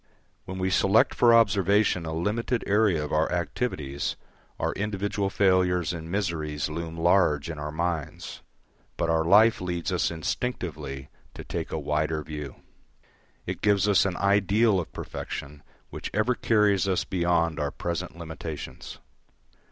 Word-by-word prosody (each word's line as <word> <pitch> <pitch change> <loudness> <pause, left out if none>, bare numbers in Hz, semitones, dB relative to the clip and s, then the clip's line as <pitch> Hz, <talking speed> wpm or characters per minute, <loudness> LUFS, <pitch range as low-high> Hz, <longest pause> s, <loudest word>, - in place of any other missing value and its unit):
When 95 - -6
we 95 0 -1
select 100 +3 +4
for 120 - +5
observation 100 -5 +3
a - - -3
limited 105 +9 -1
area 100 -7 +2
of - - -7
our 80 +1 +1
activities, 85 - -2 0.4
our - - 0
individual 100 -1 -2
failures 90 -3 +2
and 80 -1 -7
miseries 80 -6 -2
loom 85 +1 -5
large 85 -3 +2
in 80 - -7
our 75 0 -4
minds; 85 +1 -4 0.6
but 80 - 0
our 80 -1 +2
life 105 +6 +5
leads 90 0 -3
us 90 - +1
instinctively 80 - -4 0.3
to - - -7
take - - -5
a - - -2
wider 75 +1 -1
view. 75 -3 -7 0.9
It - - -5
gives 100 -1 +3
us 100 -1 +5
an 95 -2 -2
ideal 100 +1 +3
of 85 - -5
perfection 70 +1 -7 0.3
which - - -5
ever 110 +4 +2
carries 105 -5 +2
us 95 -2 +1
beyond 85 -3 0
our 75 -1 0
present 85 +2 -4
limitations. 80 -2 -7
90 Hz, 145 wpm, -26 LUFS, 80-100 Hz, 0.9 s, for